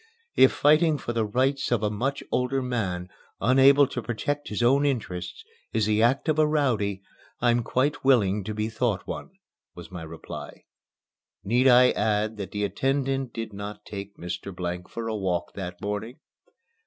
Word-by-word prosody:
"If - - +7
fighting 155 +1 +4
for 120 - -4
the 115 -2 0
rights 135 +5 0
of 115 -3 +1
a 105 - +1
much 135 +7 -2
older 130 +1 0
man, 95 -8 -2 0.3
unable 135 +3 +6
to 125 - -4
protect 145 +6 -3
his 105 +3 -2
own 135 +4 +4
interests, 120 - -3 0.3
is 110 -2 +2
the 105 0 +2
act 130 +7 +2
of 155 -1 +2
a 155 - +5
rowdy, 110 -10 0 0.4
I'm 120 0 +3
quite 140 +5 0
willing 105 -7 +3
to 105 0 -4
be 105 0 -1
thought 110 -3 -1
one," - - -6 0.5
was 90 0 -11
my 90 -2 -7
reply. 80 0 -9 0.8
Need 120 +6 +3
I 125 0 +7
add 110 +1 0
that 100 -3 -5
the 105 +1 -3
attendant 135 +3 -1
did 115 -2 -6
not 100 +1 -7
take 100 0 -8
Mr. 90 +2 -6
Blank 90 0 -4
for 115 -1 -5
a 110 - -2
walk 95 -4 -2
that 90 -2 -6
morning? 105 +5 -4
115 Hz, 170 wpm, -26 LUFS, 100-135 Hz, 0.8 s, If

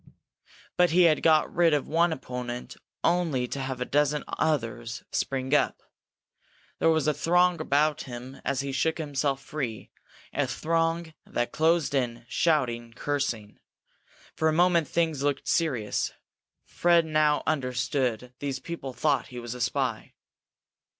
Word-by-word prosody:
But 180 0 +5
he 180 +2 +5
had 160 -3 +4
got 155 -1 +3
rid 170 -3 +4
of 145 - -2
one 170 +2 +3
opponent 125 -3 -5 0.3
only 160 -8 +1
to 140 - -5
have 130 -1 -3
a 125 - -1
dozen 150 +1 +1
others 115 -6 -2
spring 130 0 -1
up. 150 - +2 1.0
There - - +4
was 160 -3 +2
a 150 - +3
throng 175 +1 +2
about 150 0 +2
him 125 +1 -9
as 140 -1 0
he 140 0 -4
shook 160 +4 0
himself 140 -3 -1
free, 130 -8 -5 0.4
a - - 0
throng 165 0 -1
that 120 0 -2
closed 160 -1 +2
in, 120 -3 -1
shouting, 120 -8 0
cursing. 120 -7 -3 0.8
For 160 - +2
a - - +1
moment 170 -1 +3
things 160 -2 0
looked 140 -1 -1
serious. 125 -11 0 0.5
Fred 170 -1 +3
now 155 -1 +2
understood 125 -3 -1
these 140 -2 -2
people 135 -3 -6
thought 140 -1 +1
he 125 - -10
was 120 -1 -5
a 125 - -7
spy. 110 -3 -1
145 Hz, 145 wpm, -27 LUFS, 125-160 Hz, 1.0 s, But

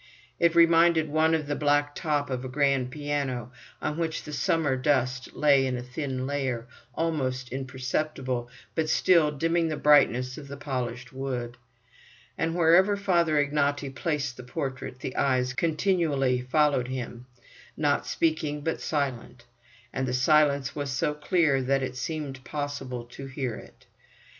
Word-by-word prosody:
It 170 0 +3
reminded 165 -1 +5
one 160 +2 +3
of 155 -2 -2
the 145 0 -2
black 145 0 +2
top 145 -3 -1
of 125 0 -2
a 130 - -5
grand 135 -1 +1
piano, 140 -4 -3 0.3
on 150 +2 -2
which 160 -1 -2
the 150 - -8
summer 145 -1 +1
dust 130 -1 0
lay 140 -3 +4
in 125 -1 -1
a 120 - -5
thin 130 0 -4
layer, 130 -4 -2 0.3
almost 130 -6 -1
imperceptible, 130 -1 -3 0.2
but 160 -1 -1
still 165 -3 +4
dimming 165 +3 0
the 155 -2 -2
brightness 130 -3 +4
of 140 - -10
the 140 0 -8
polished 125 -2 -4
wood. 125 -3 -4 0.8
And 165 0 -1
wherever 180 +4 +5
Father 170 -5 +2
Ignaty 145 -1 0
placed 145 -3 -2
the 125 - -8
portrait, 130 -1 -5
the 130 - -5
eyes 130 -2 +1
continually 155 -5 +1
followed 140 -1 +2
him, 125 -1 -6 0.5
not 145 -1 +1
speaking, 155 -2 0
but 160 +2 -2
silent; 130 -5 -3 0.5
and 130 0 -1
the 125 - -2
silence 140 +1 +3
was 145 -2 -3
so 130 +3 0
clear 150 -2 +2
that 135 +1 +1
it 130 -1 -4
seemed 135 -2 -4
possible 145 -4 -4
to 135 +3 -9
hear 130 -2 -3
it. - - -14
140 Hz, 150 wpm, -27 LUFS, 130-155 Hz, 0.8 s, reminded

